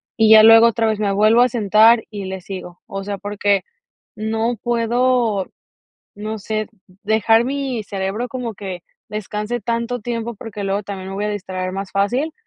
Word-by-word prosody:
y 220 -1 +4
ya 220 - +10
luego 225 +1 +8
otra 230 0 +1
vez 215 -1 0
me 205 -2 0
vuelvo 215 +4 +4
a 250 - +4
sentar 225 +1 +4
y 205 -2 -6
le 190 0 -5
sigo. 180 -2 -9
O 195 0 -5
sea, 200 0 -4
porque 205 0 0 0.5
no 225 +2 -1
puedo, 240 -3 +1 0.7
no 215 +2 -5
sé, 215 +1 -3 0.4
dejar 220 +2 +3
mi 265 -4 -3
cerebro 200 +4 -3
como 245 -2 -4
que 185 -3 -7 0.3
descanse 210 +3 -4
tanto 235 +3 -2
tiempo, 235 +1 -4
porque 210 -1 -7
luego 195 +1 -1
también 195 -1 -7
me 195 - -6
voy 205 +1 -2
a - - -1
distraer 185 -2 -4
más 195 0 -5
fácil, 245 +11 0
215 Hz, 175 wpm, -20 LUFS, 200-230 Hz, 0.7 s, ya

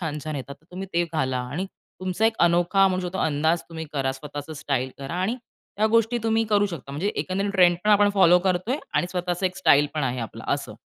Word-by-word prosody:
छान 155 -4 -3
छान 155 -1 -3
येतात. 140 +1 -6
तर 160 - -30
तुम्ही 190 +2 -6
ते 170 0 +2
घाला 130 -4 0
आणि 175 +8 -3 0.3
तुमचा 185 +4 +1
एक 225 - 0
अनोखा 175 +3 +3
म्हणू 185 0 -1
शकतो, 190 +2 -5
अंदाज 160 +2 +1
तुम्ही 160 -1 -6
करा. 135 -2 0
स्वतःचं 145 +2 -8
स्टाईल 140 -4 -2
करा 140 +4 -6
आणि 220 +6 0 0.4
त्या 215 - +3
गोष्टी 230 +1 +3
तुम्ही 225 0 +2
करू 205 -1 +4
शकता. 165 -8 -8
म्हणजे 165 +8 -1
एकंदरीत 195 +2 -1
ट्रेंड 180 -3 +5
पण 215 - +3
आपण 205 0 +5
फॉलो 180 -3 +6
करतोय 190 +8 0 0.2
आणि 175 - +2
स्वतःचा 180 0 -1
एक 185 0 -5
स्टाईल 150 -6 +4
पण 155 - -1
आहे 125 -1 -2
आपला 115 - -7
असं. - - -7
175 Hz, 220 wpm, -24 LUFS, 150-195 Hz, 0.4 s, फॉलो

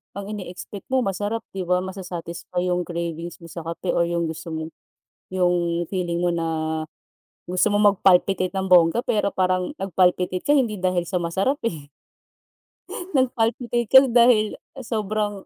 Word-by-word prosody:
ang 200 +1 -6
ine-expect 195 0 -8
mo 260 -1 +1
masarap 205 +4 -2
'di 185 -2 -5
ba 180 0 +2
masa-satisfy 180 -1 -4
yung 180 0 -1
cravings 170 0 -5
mo 170 - -11
sa 170 - -6
kape, 170 +2 -3
or 170 - +1
yung 170 0 -1
gusto 160 0 -5
mo, 160 0 -5 0.6
yung 175 -2 +1
feeling 175 -3 -2
mo 175 0 +1
na 165 -1 -1 1.0
gusto 180 +4 +1
mong 205 -1 +4
mag-palpitate 185 0 +3
ng 190 - -1
bongga, 180 +5 +4
pero 210 -2 +1
parang 185 +8 -1
nag-palpitate 180 -1 +1
ka 290 0 +3
hindi 215 -8 0
dahil 180 -2 +1
sa 180 +1 -2
masarap, 195 - 0
eh. 155 -7 -9 1.3
Nag 260 -3 +3
palpitate 235 +1 0
ka 265 +5 +8
da 240 -3 +5
dahil 215 -4 +3 0.2
sobrang 210 -3 -2
185 Hz, 155 wpm, -23 LUFS, 175-210 Hz, 1.3 s, ka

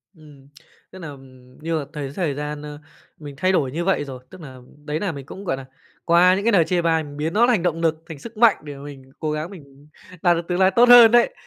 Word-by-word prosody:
Ừm, 145 -4 -18 0.4
tức 185 - -12
nà 150 -4 -8 0.5
như 165 +1 -2
mà 145 - -6
thấy 145 -3 -6
thời 170 -6 -1
gian, 150 +1 -6
ơ, 150 0 -9 0.4
mình 145 -2 -10
thay 185 +6 +1
đổi 140 -8 0
như 170 +5 -4
vậy 190 -6 +1
rồi, 130 -2 -10
tức 185 - -14
nà, 130 -4 -11 0.3
đấy 150 +1 -3
nà 200 -4 -2
mình 140 -4 -9
cũng, 190 +7 -10
gọi 135 - -2
nà, 135 - -9 0.4
qua 175 +2 +5
những 200 +2 -4
cái 235 - +3
lời 175 -6 +4
chê 175 +1 0
bai 165 -1 +1
mình 145 -1 -11
biến 155 +3 -3
nó 235 +3 +4
thành 225 -8 +1
động 165 -2 -1
nực, 160 -1 -1
thành 150 -4 -9
sức 230 +4 -11
mạnh 230 -1 +5
để 145 -1 -9
mà 140 - -12
mình 135 -2 -12
cố 155 -2 -2
gắng 155 +2 -4
mình 145 -6 -15 0.3
đạt 175 -2 +3
được 170 0 -6
tương 180 0 -2
lai 190 0 +4
tốt 245 +1 +5
hơn 240 -2 +9
đấy. 240 - +3
160 Hz, 265 wpm, -21 LUFS, 145-185 Hz, 0.5 s, hơn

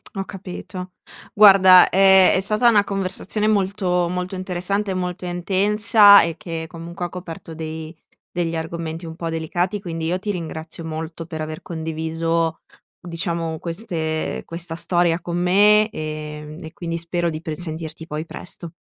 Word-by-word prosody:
Ho 195 - -2
capito. 185 -1 -8 0.4
Guarda 190 -3 +8
è 190 0 +6
è - - +3
stata 215 +5 +3
una 210 -3 +4
conversazione 195 +2 -2
molto 190 -4 +1
molto 180 +2 -3
interessante 185 +2 -2
e - - -1
molto 180 -1 -4
intensa 200 +4 +5
e 165 0 -3
che, 165 -2 -5
comunque, 170 +1 -7
ha - - -5
coperto 170 -2 -8
dei 160 0 -7 0.4
degli 170 -1 -2
argomenti 165 0 -5
un 160 - -8
po' 165 0 -4
delicati, 175 +5 -2
quindi 165 -3 -4
io 180 +3 -1
ti 210 +2 -6
ringrazio 165 -3 -5
molto 160 +1 -6
per 160 -2 -6
aver 155 0 -6
condiviso, 160 0 -2 0.4
diciamo, 170 -1 -3
queste 165 -3 -3
ehm, - - -8
questa 165 0 -6
storia 175 0 +1
con 170 0 -4
me, 205 +4 +5
ehm, 155 -2 -6
e 160 - -8
quindi 170 -4 -4
spero 170 +1 -1
di 155 0 -6
pr 160 -2 -4
sentirti 160 -2 -5
poi 155 0 -5
presto. 170 0 -7
170 Hz, 155 wpm, -21 LUFS, 160-190 Hz, 0.4 s, Guarda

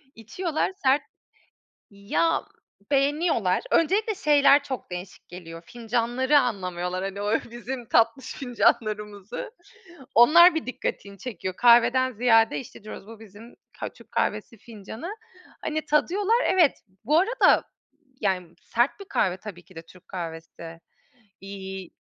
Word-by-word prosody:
içiyorlar, 315 - -3
sert 270 +2 +4 0.9
ya, 200 +12 0 0.5
beğeniyorlar. 280 - +1
Öncelikle 405 +6 +2
şeyler 290 -3 +4
çok 260 -9 -6
değişik 180 +1 -8
geliyor, 165 -2 -10
fincanları 240 +4 +1
anlamıyorlar, 185 -6 -3
hani, 195 +1 -5
o 210 +2 +1
bizim 240 +1 -6
tatlış 230 +3 +2
fincanlarımızı. 215 - -1 0.6
Onlar 335 +9 +8
bir 320 - -3
dikkatini 200 -5 -5
çekiyor, 185 -6 -5
kahveden 245 +2 +5
ziyade 225 -1 +3
işte 225 -4 -13
diyoruz: 215 - -9
"Bu 225 0 -12
bizim 220 +3 -14 0.3
ka - - -3
Türk - - -19
kahvesi 230 - -2
fincanı." 230 - -9 0.5
hani, 310 0 -2
tadıyorlar, 395 +10 +2
evet. 345 -6 +3 0.2
Bu 305 +6 +3
arada, 455 +8 +3 0.6
yani, 180 -4 -2
sert 240 - 0
bir - - -7
kahve 185 - 0
tabii 185 -4 -10
ki 185 - -20
de 165 - -7
Türk 180 +2 -20
kahvesi, 165 -1 -8 0.6
iii, 190 -2 -8
230 Hz, 125 wpm, -25 LUFS, 195-285 Hz, 0.9 s, Onlar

